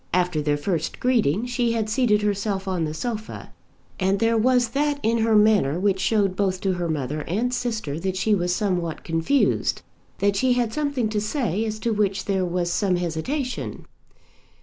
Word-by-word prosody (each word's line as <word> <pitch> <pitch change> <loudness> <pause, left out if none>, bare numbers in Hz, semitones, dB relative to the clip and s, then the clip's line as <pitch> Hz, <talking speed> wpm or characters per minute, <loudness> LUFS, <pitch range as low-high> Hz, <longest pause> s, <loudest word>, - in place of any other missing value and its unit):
After 180 -4 +1
their 145 0 +1
first 160 +1 -2
greeting 230 - +2
she 245 -1 0
had 220 -2 -1
seated 215 -2 +2
herself 200 -1 -1
on 180 -4 0
the 155 - -4
sofa, 220 +3 -5 0.5
and 190 +1 +2
there 225 +3 +2
was 245 +1 +3
that 285 +3 0
in 230 +1 +2
her 225 0 +3
manner 210 -8 +4
which 195 0 +1
showed 200 -3 +1
both 190 -1 0
to 190 -1 +1
her 175 -2 -2
mother 150 -1 -2
and 235 +8 -1
sister 220 - -2
that 190 +1 -2
she 210 +3 +2
was 180 -3 +1
somewhat 180 -4 -1
confused, 165 +12 +1 0.3
that 200 0 +1
she 255 +5 +3
had 240 -3 0
something 285 -5 0
to 210 -1 -1
say 215 - -1
as 215 -1 -3
to 230 +1 -1
which 200 -2 0
there 190 -2 0
was 175 0 -1
some 195 -3 +1
hesitation. 180 - -3
205 Hz, 180 wpm, -24 LUFS, 180-230 Hz, 0.5 s, manner